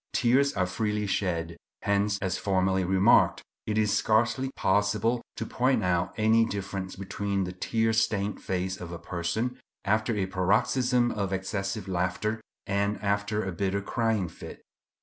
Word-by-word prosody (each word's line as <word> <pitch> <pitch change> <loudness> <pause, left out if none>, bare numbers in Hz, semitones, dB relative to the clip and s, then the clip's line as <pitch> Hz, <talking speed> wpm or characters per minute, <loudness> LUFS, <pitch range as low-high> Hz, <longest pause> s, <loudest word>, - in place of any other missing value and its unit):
Tears 130 +4 +3
are 90 - +1
freely 105 +3 -1
shed. 85 -4 -1 0.3
Hence, 100 0 +1
as 95 -1 -1
formerly 95 -1 +1
remarked, 95 +1 +4 0.2
it 110 0 0
is 105 -2 +2
scarcely 120 +4 +2
possible 105 +4 +1
to 115 - -4
point 130 +1 +1
out 90 0 +1
any 110 +1 +4
difference 100 -3 -4
between 100 0 -2
the 90 - -4
tear 110 +5 0
stained 105 -2 0
face 90 0 -2
of 85 -1 -7
a 85 - -5
person 90 +9 -3 0.3
after 110 +3 +1
a 95 - +1
paroxysm 120 +7 +2
of 100 -3 -2
excessive 95 +1 -3
laughter 95 +5 -1 0.2
and 100 +1 0
after 100 +1 0
a 95 - -3
bitter 95 +2 -1
crying 110 -3 0
fit. 80 - -11
100 Hz, 150 wpm, -28 LUFS, 95-110 Hz, 0.3 s, remarked